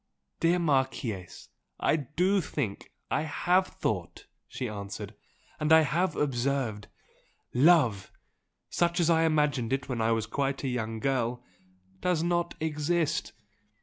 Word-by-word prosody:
"Dear 170 +2 +3
Marchese, 130 - -1 0.3
I - - +3
DO 180 +8 +1
think! 130 - -4 0.2
I - - +2
HAVE 180 +4 +1
thought!" - - -4 0.2
she 125 - -4
answered 100 0 -6 0.5
"And 150 0 0
I 160 0 +9
have 160 +4 0
observed! 130 -5 -1 0.7
Love 125 - +4 0.6
such 175 +1 +1
as 170 -1 +3
I 165 0 +4
imagined 150 -7 +1
it 135 0 -1
when 120 -3 -2
I 110 +1 +2
was 115 -1 +1
quite 135 +4 -2
a - - -1
young 115 -3 -2
girl 125 -1 -1 0.6
does 175 -3 +1
not 175 0 0
exist. 160 +1 -1
140 Hz, 130 wpm, -29 LUFS, 120-165 Hz, 0.7 s, I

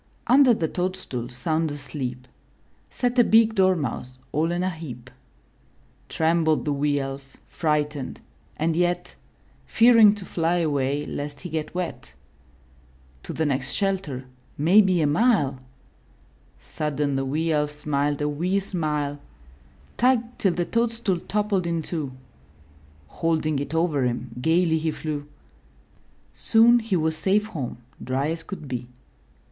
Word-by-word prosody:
Under 260 +1 +6
the 165 - -1
toadstool 180 -10 -3
sound 155 +6 -1
asleep. 135 -3 -6 0.6
Sat 245 0 0
a - - +8
big 225 0 +5
Dormouse 160 - 0
all 160 +3 +1
in 175 +1 -1
a 185 - +1
heap. 130 -7 -9 1.0
Trembled 160 -1 +1
the 150 - 0
wee 145 +1 +1
Elf, 135 0 -6
frightened, 150 -3 -2 0.4
and 160 +1 0
yet 175 +1 0 0.5
Fearing 225 -3 +6
to 200 -3 -9
fly 170 0 0
away 145 -3 0
lest 145 0 -5
he 180 - -6
get 155 +1 -4
wet. 180 -2 -5 1.1
To - - -7
the 160 - -1
next 135 -2 -1
shelter 190 -10 -1 0.2
— - - -33
maybe 190 -4 +6
a - - +3
mile! 145 - +2 1.0
Sudden 145 -2 -2
the 135 - 0
wee 155 +5 -1
Elf 150 -1 +1
smiled 145 -1 -1
a - - +1
wee 175 +7 0
smile, 150 -6 -2 0.8
Tugged 245 -1 +1
till 190 -4 +2
the 175 0 -1
toadstool 230 -5 0
toppled 205 -4 0
in 165 -1 -1
two. 155 -6 -3 1.0
Holding 155 - 0
it 145 +3 -4
over 160 -5 +1
him, 120 0 -2
gayly 160 +1 +2
he 160 +1 -1
flew. 150 -2 -4 1.1
Soon 235 +1 +5
he 220 -4 -1
was 160 -1 +1
safe 195 +6 +1
home, 150 - -5 0.3
dry 135 +4 -1
as 165 0 -3
could 175 -5 -8
be. 125 -2 -4
160 Hz, 135 wpm, -24 LUFS, 145-185 Hz, 1.1 s, a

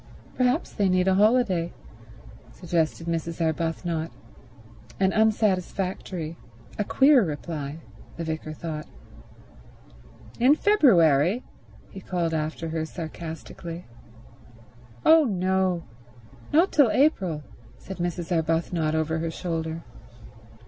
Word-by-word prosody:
"Perhaps 255 +5 0
they 200 -2 +1
need 185 0 +2
a 190 - +4
holiday," 205 -4 +3 0.8
suggested 165 -1 -1
Mrs. 165 0 -3
Arbuthnot; 165 0 -1 0.9
an 190 0 +2
unsatisfactory, 190 -5 0 0.4
a - - +2
queer 270 +3 +5
reply, 150 -2 -4 0.4
the 170 - -3
vicar 160 -1 -4
thought. 155 -1 -6 1.5
"In 260 +5 +6
February?" 195 - +4 0.5
he 195 - -9
called 175 -3 -2
after 160 +1 -2
her 160 0 -2
sarcastically. 165 +1 -7 1.2
"Oh 320 -1 +7
no—not 180 - -1
till 285 -6 +5
April," 190 - +1 0.3
said 190 - -9
Mrs. 175 0 -2
Arbuthnot 165 -1 0
over 160 0 0
her 165 0 -2
shoulder. 165 -1 -4
170 Hz, 95 wpm, -25 LUFS, 160-195 Hz, 1.5 s, Oh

